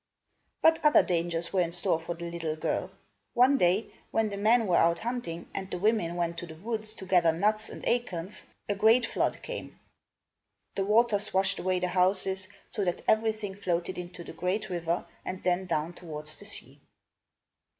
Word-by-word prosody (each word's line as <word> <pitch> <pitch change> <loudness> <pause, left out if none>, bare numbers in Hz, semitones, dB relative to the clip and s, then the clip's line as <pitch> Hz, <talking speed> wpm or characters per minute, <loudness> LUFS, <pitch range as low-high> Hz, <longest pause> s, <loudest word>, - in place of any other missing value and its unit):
But 320 0 +5
other 300 -1 +6
dangers 170 0 -1
were 190 - +3
in 170 -1 0
store 175 -1 +1
for 165 +1 -5
the 170 0 -6
little 165 -2 -3
girl. 155 - -1 0.5
One 260 +3 +5
day, 180 +5 +2 0.2
when 225 -1 +1
the 200 - -5
men 225 +3 +4
were 180 -3 +2
out 170 0 +4
hunting, 220 -6 -4
and 190 -1 -4
the - - -3
women 190 -3 +1
went 170 -1 -1
to 175 - -7
the 160 - -10
woods 215 +4 -4
to 190 - -9
gather 180 -3 +4
nuts 210 +6 0
and - - -9
acorns, 200 -6 -1 0.2
a 205 - +1
great 225 +4 +5
flood - - -1
came. - - -7 0.9
The 195 - -1
waters 210 -1 +2
washed 190 +1 +2
away 185 0 +1
the 180 - 0
houses, 190 +1 +2 0.2
so 205 - -1
that 175 -2 -1
everything 220 -2 +1
floated 185 -2 -2
into 175 0 -8
the - - -9
great 185 +5 -2
river, 170 0 -1 0.2
and 185 - -5
then 185 +1 +1
down 165 0 -1
towards 155 -3 -5
the - - -8
sea. - - -2
185 Hz, 180 wpm, -29 LUFS, 170-215 Hz, 0.9 s, other